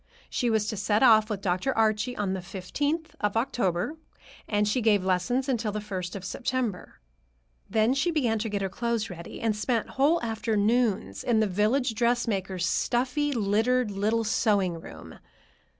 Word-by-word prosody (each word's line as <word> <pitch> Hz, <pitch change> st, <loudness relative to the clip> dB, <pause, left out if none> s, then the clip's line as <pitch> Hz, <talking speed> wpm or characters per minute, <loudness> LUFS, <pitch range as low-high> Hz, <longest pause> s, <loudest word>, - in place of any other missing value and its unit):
She 245 Hz, -, 0 dB
was 220 Hz, -2 st, +1 dB
to -, -, -3 dB
set 205 Hz, +4 st, +1 dB
off 220 Hz, -3 st, +6 dB
with 205 Hz, -3 st, -3 dB
Dr. 195 Hz, +8 st, 0 dB
Archie 220 Hz, +2 st, +1 dB
on 200 Hz, -2 st, -1 dB
the 190 Hz, -, -3 dB
fifteenth 285 Hz, -, -3 dB
of 210 Hz, +1 st, 0 dB
October, 225 Hz, -, -1 dB, 0.5 s
and 210 Hz, -1 st, +1 dB
she 225 Hz, +4 st, +1 dB
gave 210 Hz, -4 st, +3 dB
lessons 245 Hz, +9 st, 0 dB
until 235 Hz, -5 st, 0 dB
the 210 Hz, -, -3 dB
first 190 Hz, -4 st, -5 dB
of 195 Hz, -1 st, -6 dB
September. 240 Hz, -1 st, -3 dB, 0.7 s
Then 220 Hz, +3 st, +3 dB
she 275 Hz, +6 st, +1 dB
began 245 Hz, -9 st, +1 dB
to 225 Hz, +1 st, -2 dB
get 200 Hz, -1 st, -2 dB
her -, -, 0 dB
clothes 235 Hz, +1 st, -2 dB
ready, 170 Hz, -1 st, -8 dB
and 225 Hz, -2 st, 0 dB
spent 225 Hz, +1 st, -1 dB
whole 295 Hz, +6 st, +2 dB
afternoons 220 Hz, -, 0 dB
in 230 Hz, -2 st, +2 dB
the 220 Hz, -, +3 dB
village 215 Hz, +6 st, +1 dB
dressmaker's 215 Hz, -6 st, 0 dB
stuffy, 265 Hz, -, 0 dB
littered 225 Hz, +1 st, +1 dB
little 215 Hz, +3 st, 0 dB
sewing 200 Hz, -6 st, +1 dB
room. -, -, -11 dB
220 Hz, 165 wpm, -27 LUFS, 200-245 Hz, 0.7 s, off